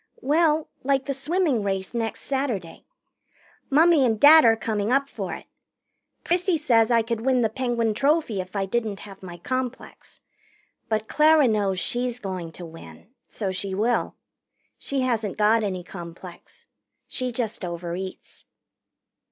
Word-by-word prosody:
"Well, 310 +1 +2 0.2
like 270 0 +1
the 280 - -2
swimming 295 - 0
race 195 0 -3
next 225 -2 -3
Saturday. 245 -11 -3 0.8
Mummy 315 +1 +5
and 225 -4 +1
Dad 310 +4 +9
are 225 -1 +6
coming 215 -1 -2
up 275 +1 +2
for - - -5
it. - - -11 0.8
Prissy 355 0 +1
says 235 -7 +3
I 230 -2 +3
could 225 0 -3
win 255 0 +2
the 220 - +2
Penguin 235 -2 -1
Trophy 275 - +1
if 185 +2 -12
I 195 -1 0
didn't 215 0 -2
have 195 -2 -11
my 175 -2 -9
complex. 255 +6 -5 0.7
But 220 -1 -1
Clara 305 -2 +5
knows 200 -4 0
she's 245 +3 -1
going 185 -6 -5
to 175 - -8
win. 165 +6 -13 0.2
So 200 -4 -4
she 190 +1 -4
will. 230 +5 0 0.6
She 275 -1 -2
hasn't 230 -6 -1
got 215 +2 +4
any 185 -3 -3
complex. 175 0 -11 0.4
She 255 -1 -2
just 230 -3 -4
overeats." 175 +1 -6
230 Hz, 145 wpm, -24 LUFS, 195-270 Hz, 0.8 s, Dad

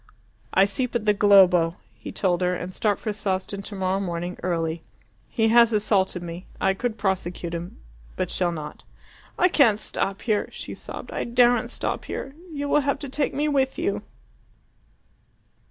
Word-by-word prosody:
"I 190 - +5
sleep 245 +5 -3
at 225 -3 0
the 210 - +5
Globo," 185 -5 +5 0.2
he - - -9
told 180 -3 0
her, 180 0 +1
"and 180 +1 -6
start 205 0 +1
for 215 - -3
Sawston 200 -1 -2
tomorrow 190 -1 -2
morning 175 -1 -3
early. 165 -2 -1 0.5
He 225 -2 +2
has 235 0 +6
assaulted 195 -4 +1
me. 170 +2 -7
I 190 - +2
could 230 +3 -3
prosecute 180 -4 -2
him. 170 +1 -6 0.4
But - - -2
shall 175 -2 +1
not." 155 -3 -7 0.5
"I 365 - +5
can't 255 - +4
stop 195 -2 -3
here," 215 -3 0
she - - -7
sobbed. - - -8
"I - - -2
daren't 240 -1 +3
stop - - -3
here. 270 - -5 0.2
You 285 -2 -3
will 295 - +3
have 280 0 0
to 280 -1 -7
take 280 +1 -1
me 295 +2 +1
with 270 -2 +1
you!" 345 +5 -1
200 Hz, 170 wpm, -24 LUFS, 180-240 Hz, 0.5 s, has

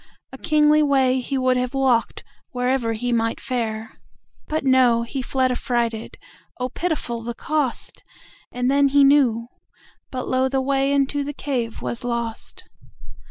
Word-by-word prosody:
A - - -7
kingly 305 -1 +4
way 265 -3 +3
he 270 +2 -3
would 255 -1 +2
have 250 +1 -2
walked, 255 -4 +1 0.3
Wherever 250 -2 0
he 245 +3 -2
might 230 -1 0
fare. 225 -3 -4 0.5
But 310 -1 -2
no; 255 -3 +4
he 260 +3 -4
fled 260 0 0
affrighted(Oh, 240 +1 -4
pitiful 275 -7 -3
the 235 +1 -5
cost!)And 260 -3 -4
then 280 0 +4
he 280 +1 +4
knew; 250 -5 +3 0.6
but 255 -2 -5
lo! 260 0 +1
the 270 0 0
wayInto 275 +1 +1
the 290 +1 -5
cave 250 -6 -3
was 240 +2 -3
lost. 235 -2 -4
255 Hz, 135 wpm, -22 LUFS, 235-275 Hz, 0.6 s, kingly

